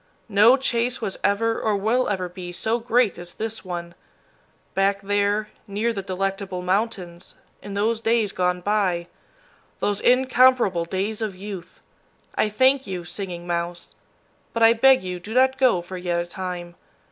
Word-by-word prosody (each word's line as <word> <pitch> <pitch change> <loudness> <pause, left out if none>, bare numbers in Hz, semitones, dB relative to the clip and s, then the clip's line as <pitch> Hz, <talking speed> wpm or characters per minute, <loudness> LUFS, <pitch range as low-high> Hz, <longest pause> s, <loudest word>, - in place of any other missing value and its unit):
No 215 +5 +6
chase 250 -1 0
was 200 -5 -4
ever 225 +3 +1
or 215 -2 +1
will 225 +6 +1
ever 185 -3 -1
be 180 0 -8
so 220 +6 -1
great 235 -4 +1
as 175 0 -8
this 225 0 -4
one 175 -2 -6 0.8
back 195 +1 +1
there, 205 +1 0 0.2
near 215 +4 -1
the 200 - -3
Delectable 195 -1 -3
Mountains, 185 -3 -2 0.3
in 200 -1 -7
those 220 +2 0
days 225 -2 +2
gone 180 -1 0
by, 185 -4 0 0.7
those 205 -1 -1
incomparable 250 -7 +4
days 195 +5 -3
of 215 -4 -3
youth! 190 -2 -9 0.5
I 215 - +1
thank 260 +4 +3
you, 180 -2 -5
Singing 175 -2 -5
Mouse; 170 0 -4 0.6
but 230 - +1
I 225 0 +8
beg 260 0 +5
you 180 -1 -4
do 215 +6 -8
not 260 +1 +3
go 235 -10 +3
for 185 +1 -7
yet 175 -1 -1
a 170 - -2
time. 175 -1 -6
200 Hz, 160 wpm, -23 LUFS, 180-225 Hz, 0.8 s, I